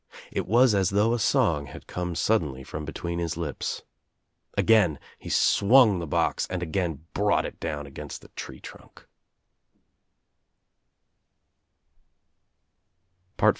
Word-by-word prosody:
It - - -3
was 120 +2 +5
as 95 -2 +2
though 105 +4 +2
a 120 - 0
song 75 -8 +2
had 65 - -11
come 90 -1 -4
sud 110 +5 +2
denly 65 -4 -7
from 75 - -6
between 85 +2 -4
his 85 -2 -2
lips. 80 -5 -4 0.7
Again 105 -9 +4 0.2
he - - -9
swung 110 -2 +5
the 85 - -5
box - - 0
and 90 -1 -3
again 80 -3 -2
brought 105 0 +2
it - - -7
down 75 -3 -4
against 70 - -9
the - - -15
tree - - -8
trunk. - - -14
85 Hz, 125 wpm, -26 LUFS, 80-105 Hz, 0.7 s, was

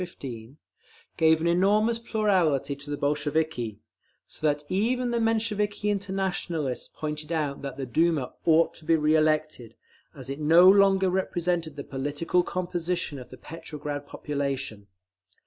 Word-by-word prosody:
15) 130 -7 -8 0.6
gave 160 -1 +4
an - - -1
enormous 205 +6 +3
plurality 180 - +1
to 140 +1 -10
the 145 - -2
Bolsheviki; 145 -6 -1 0.5
so 155 - -3
that 145 0 0
even 240 +7 0
the 235 - 0
Mensheviki 210 -2 0
Internationalists 190 -8 -2
pointed 150 0 -6
out 150 -4 -1
that 140 -2 -6
the 135 - -3
Duma 155 +1 +1
ought 165 0 +4
to 160 - -15
be 165 0 +4
re 155 0 +2
elected, 155 -7 0 0.4
as 130 -3 -8
it 135 +2 -5
no 165 +4 +6
longer 195 -1 +5
represented 175 -4 -1
the 140 - -6
political 145 +7 -1
composition 175 -4 -3
of 125 - -11
the 130 - -11
Petrograd 150 -2 -7
population…. 140 -9 -4
160 Hz, 140 wpm, -27 LUFS, 145-185 Hz, 0.6 s, no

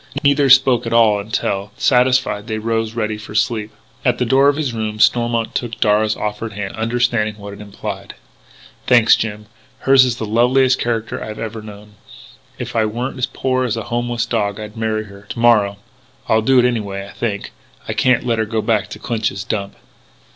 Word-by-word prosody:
Neither 140 -1 +3
spoke 130 -2 +5
at 115 - -2
all 110 -3 +4
until, 100 -1 -2
satisfied, 125 -4 +2
they 110 -2 -2
rose, 115 0 -2
ready 110 -2 -2
for 105 0 -10
sleep. 110 -3 0 0.3
At 125 -2 +2
the 125 - 0
door 135 +4 +4
of 145 - +1
his 145 -5 -2
room 110 -1 -4
Stormont 120 0 +2
took 120 -2 -4
Darragh's 105 0 +2
offered 105 +1 -4
hand, 100 -1 -5
understanding 115 -1 0
what 100 -1 -9
it 100 - -11
implied: 100 -1 -7 0.7
"Thanks, 120 -2 +6
Jim.... 105 -1 -4 0.4
Hers 135 -1 +6
is 125 -3 0
the 110 - -3
loveliest 125 +4 +3
character 115 -1 -2
I - - -7
have 110 0 -7
ever 110 0 -5
known.... 105 -1 -12 0.6
If - - -6
I 115 - +3
weren't 120 +5 -3
as 125 - +1
poor 130 -1 -1
as 115 -3 -1
a 115 - -3
homeless 120 -1 -1
dog 105 -3 -1
I'd 105 0 -8
marry 110 -1 -1
her 100 0 -14
to - - -6
morrow.... 110 -4 +3 0.5
I'll 110 - +3
do 130 +4 +3
it 125 - +5
anyway, 100 -5 -2
I - - -13
think.... 105 -4 -3 0.4
I - - -2
can't 125 -2 +2
let 115 -2 0
her 110 - +1
go 110 0 -2
back 110 -2 +1
to 105 - -8
Clinch's 110 -4 -2
Dump!" 100 -2 -4
110 Hz, 195 wpm, -18 LUFS, 105-120 Hz, 0.7 s, Thanks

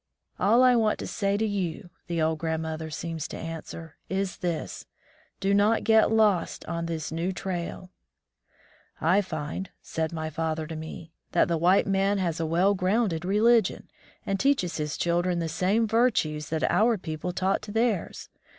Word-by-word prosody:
"All 230 +5 +5
I 250 -1 +6
want 220 -2 +2
to - - -5
say 200 -1 -1
to 220 - +1
you," 190 -3 -3 0.2
the 170 -1 -2
old 160 0 0
grand 160 0 -2
mother 160 0 -4
seems 165 0 -4
to - - -7
answer, 165 -1 -7
"is 190 -1 -2
this: 165 - -4 0.5
Do 195 0 +1
not 210 +3 +3
get 220 0 +4
lost 215 -5 +2
on 170 0 -3
this 160 -2 -4
new 165 +3 -1
trail." 185 -1 -5 1.1
"I 180 +6 +3
find," 165 +1 -5
said 160 -1 -3
my 160 -1 -4
father 160 0 -2
to 160 +1 -7
me, 160 +1 -8 0.2
"that - - +4
the 170 - +1
white 180 +4 +4
man 195 +1 +1
has 170 -4 -1
a 165 - -1
well 180 +5 +3
grounded 185 -2 0
religion, 220 +4 +2 0.3
and 195 0 -1
teaches 265 -11 +1
his 150 -1 -3
children 175 +1 +1
the 165 -1 -1
same 195 +8 +1
virtues 210 - +1
that 160 -1 -1
our 220 +4 +3
people 160 0 -4
taught 190 +2 0
to 205 - -8
theirs. 225 -4 -1
180 Hz, 170 wpm, -27 LUFS, 160-205 Hz, 1.1 s, I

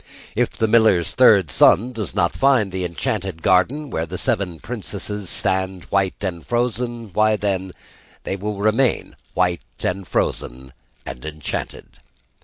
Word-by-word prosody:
If - - +2
the 110 - -1
miller's 110 -7 +4
third 100 - +5
son 120 - +4
does 110 -5 -3
not 85 - +1
find 130 -8 +3
the 95 -1 -2
enchanted 90 0 -3
garden 125 - +2
where 80 +1 -2
the 90 +3 -5
seven 90 -4 -1
princesses 105 -3 -5
stand 95 -1 -1
white 95 -1 +1
and 90 -5 -3
frozen 120 -2 -2
why, 110 0 +3
then, 95 -3 -2 0.5
they - - -3
will 105 +1 -4
remain 110 +5 +1 0.2
white 90 -1 +1 0.2
and 95 +1 -2
frozen 65 +1 -2 0.3
and 60 - -7
enchanted. 80 -1 -5
100 Hz, 140 wpm, -21 LUFS, 90-110 Hz, 0.5 s, third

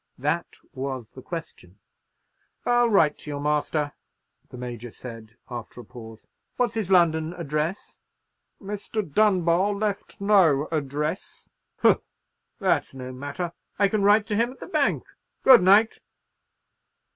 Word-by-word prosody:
—that - - -2 0.2
was 130 -4 -5
the 130 - -11
question. 130 - -8 0.9
"I'll 240 -1 +3
write 165 -8 +3
to - - -9
your 145 -1 -4
master," 150 0 -1 0.6
the - - -10
Major 120 -1 -6
said, 115 -2 -11
after 120 -1 -8
a - - -15
pause; 115 -2 -12 0.3
"what's 245 -3 +1
his 220 -5 -3
London 165 -3 +3
address?" 160 +2 -3 0.6
"Mr. 210 +2 -4
Dunbar 185 +1 +2
left 205 -1 -3
no 180 -8 +4
address." 150 0 -3 0.3
"Humph! - - +5 0.6
That's - - 0
no 130 -1 -7
matter. 145 +6 -5 0.2
I 200 -1 +3
can 215 0 0
write 205 +1 +5
to 215 - -2
him 235 +3 +1
at - - -21
the - - -7
bank. - - 0 0.4
Good 260 -5 +8
night." 205 +5 +5
160 Hz, 135 wpm, -25 LUFS, 135-205 Hz, 0.9 s, Good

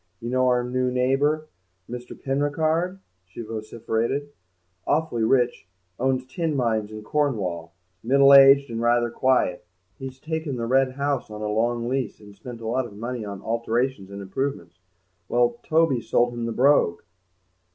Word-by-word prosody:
"You 120 +1 -5
know 130 0 +2
our 125 -1 +2
new 125 +1 -1
neighbour, 140 +5 +1 0.4
Mr. 125 0 -8
Penricarde?" 155 +6 0 0.3
she 90 +5 -10
vociferated; 115 +5 -3 0.6
"awfully 150 -7 0
rich, 120 -5 +1 0.3
owns 130 0 0
tin 160 +3 -2
mines 110 -5 0
in 110 0 -8
Cornwall, 100 - -1 0.3
middle 140 +3 +5
aged 140 -1 +7
and 115 0 -3
rather 120 0 +2
quiet. 125 -8 +1 0.4
He's 130 0 -8
taken 160 -2 -3
the 115 -1 -3
Red 130 +2 +2
House 140 -2 -2
on 105 0 -7
a - - -1
long 115 +2 0
lease 130 -1 -2
and 105 -1 -14
spent 115 +3 -9
a 110 - -5
lot 125 +2 0
of 100 - -14
money 120 +1 -4
on 100 -2 -7
alterations 115 -1 -1
and 100 0 -7
improvements. 130 -2 -4 0.5
Well, 120 0 +2
Toby's 155 -7 +1
sold 120 0 +2
him 120 -1 -3
the - - -2
Brogue!" 125 -8 +3
125 Hz, 155 wpm, -24 LUFS, 115-135 Hz, 0.6 s, aged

